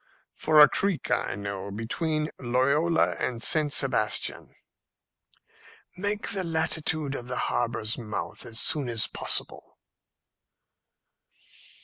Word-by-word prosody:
"For 155 -1 +3
a 150 - +10
creek 195 +3 -1
I - - 0
know, 100 -1 -5
between 150 - -2
Loyola 140 +7 +2
and 120 -2 -2
St. 150 +5 +1
Sebastian." - - +1 1.4
"Make 205 +3 -2
the 195 -2 -2
latitude 160 -3 -1
of 125 -3 -5
the 125 - -3
harbour's 115 -1 0
mouth 110 -3 -5
as 115 0 -4
soon 145 -5 +1
as 115 -2 +3
possible." - - -2
140 Hz, 105 wpm, -27 LUFS, 115-160 Hz, 1.4 s, a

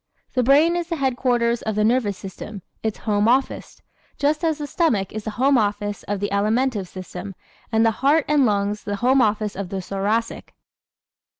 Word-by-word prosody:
The 255 - +2
brain 290 +7 +4
is 345 -1 -2
the 340 - -2
headquarters 245 -4 +1
of 220 -1 -3
the 210 - +2
nervous 220 -3 +1
system 195 +1 -8 0.2
its 220 -2 -2
"home 210 -1 +1
office" 260 +3 0 0.3
just 300 +3 0
as 320 -2 +1
the 295 - -4
stomach 240 - 0
is 215 -1 -6
the - - -2
home 270 +1 +4
office 205 -1 -2
of 205 -1 -2
the 205 - -2
Alimentive 215 +1 +1
system 185 +1 -8 0.4
and 225 0 +3
the 225 - +4
heart 290 +3 +3
and 295 -2 +3
lungs 205 -2 0
the 205 - -3
home 260 +1 +5
office 210 -2 0
of 190 -2 -5
the 195 - -3
Thoracic. 200 +5 -2
225 Hz, 185 wpm, -22 LUFS, 205-270 Hz, 0.4 s, home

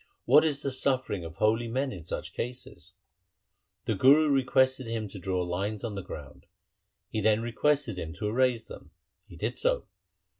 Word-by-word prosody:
What 145 +5 +6
is 150 -3 0
the 140 - -1
suffering 130 -7 0
of 80 0 -8
holy 110 +5 +1
men 130 +4 -1
in 90 -5 -8
such 85 - -5
cases? 115 -9 -6 0.5
' - - -53
The - - 0
Guru 145 +3 +5
requested 130 -1 +2
him 115 -2 -3
to 95 - -9
draw 90 0 -1
lines 100 +5 -3
on 115 -3 -3
the 100 - -4
ground. 70 -5 -10 0.6
He 110 - -1
then 110 +1 +3
requested 125 -3 0
him 80 -2 -5
to 105 +4 -4
erase 120 +1 +1
them. - - -11 0.4
He - - -13
did - - -3
so. - - +1
115 Hz, 180 wpm, -28 LUFS, 95-130 Hz, 0.6 s, What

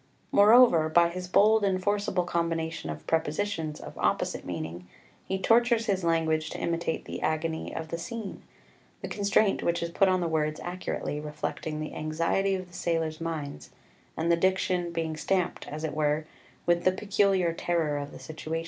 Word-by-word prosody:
Moreover, 205 -6 +6
by 170 +1 +5
his 180 +1 -6
bold 215 +4 +5
and 190 -2 +2
forcible 200 -2 0
combination 165 - -2
of 75 0 -6
prepositions 160 0 -1
of - - -9
opposite - - 0
meaning 85 +1 -6 0.4
he 190 - -1
tortures 230 +3 +3
his 195 -4 0
language 160 -2 +1
to - - -6
imitate 165 -1 -2
the - - -6
agony 160 +1 -1
of 160 -1 -5
the 170 - -4
scene, 225 +2 -6 0.6
the - - -2
constraint 200 0 +2
which 170 0 0
is 170 - -3
put 195 +3 +3
on 185 0 +2
the 175 - 0
words 155 -1 0
accurately 175 -4 -3
reflecting 150 +1 -4
the 155 - -5
anxiety 165 +5 0
of 185 -1 -5
the - - -20
sailors' 165 -2 -1
minds, 145 - -5 0.5
and 165 +1 +1
the - - +6
diction 185 0 +1
being 165 -2 -2
stamped, 180 +3 -1
as 155 +2 -6
it 155 - -2
were, 150 +1 0 0.4
with 175 0 +2
the 185 - +5
peculiar 195 -3 +2
terror 165 -4 0
of 145 0 -6
the - - -10
situation. 160 0 -5
170 Hz, 175 wpm, -28 LUFS, 155-190 Hz, 0.6 s, Moreover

